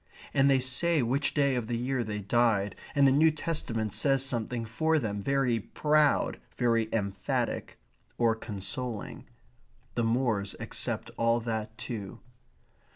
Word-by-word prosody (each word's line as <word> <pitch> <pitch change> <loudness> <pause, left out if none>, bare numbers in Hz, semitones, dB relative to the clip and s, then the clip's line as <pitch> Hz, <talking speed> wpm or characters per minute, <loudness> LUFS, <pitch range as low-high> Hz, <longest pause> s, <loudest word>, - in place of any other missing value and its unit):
And 135 +1 +4
they 135 - +5
say 145 +4 +2
which 135 +5 0
day 140 -2 +3
of 120 -3 -2
the 120 0 -1
year 125 +1 -1
they 105 -1 -4
died, 105 -1 +2 0.2
and 140 -1 +5
the - - +5
New 155 +4 +5
Testament 120 -9 -2
says 135 +5 +2
something 120 -2 -1
for 160 +9 +1
them, 105 -7 -2
very 135 -1 +1
proud, 150 +6 +1 0.2
very 115 -3 +2
emphatic, 100 -3 -2 0.4
or 115 -2 +3
consoling. 110 +1 -5 0.7
The 120 - 0
moors 115 -4 0
accept - - -3
all 115 0 +2
that 110 -1 -4
too. 110 -6 -6
120 Hz, 140 wpm, -29 LUFS, 110-135 Hz, 0.7 s, they